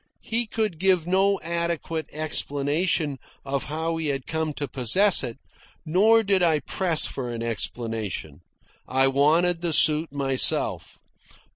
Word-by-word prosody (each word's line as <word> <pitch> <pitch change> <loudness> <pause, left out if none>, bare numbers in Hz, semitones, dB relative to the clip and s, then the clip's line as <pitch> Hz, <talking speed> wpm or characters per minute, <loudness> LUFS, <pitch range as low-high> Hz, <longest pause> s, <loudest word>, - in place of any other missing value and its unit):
He 230 +1 -2
could 215 -7 -2
give 185 -3 +2
no 195 +2 +2
adequate 170 -2 -3
explanation 150 0 -1 0.3
of 135 0 -2
how 160 +2 -3
he 160 -1 -3
had 135 -2 -3
come 160 -1 -2
to 145 0 -4
possess 140 - +3
it, 120 -2 -5 0.5
nor 215 +8 +4
did 195 -2 +2
I 160 -4 +2
press 175 -5 +1
for 125 -3 -4
an 115 -1 -5
explanation. 115 -3 -4 0.5
I 135 +1 +3
wanted 160 +6 +2
the 170 -2 -1
suit 155 +1 +3
myself. 135 -2 0
160 Hz, 135 wpm, -24 LUFS, 140-175 Hz, 0.5 s, nor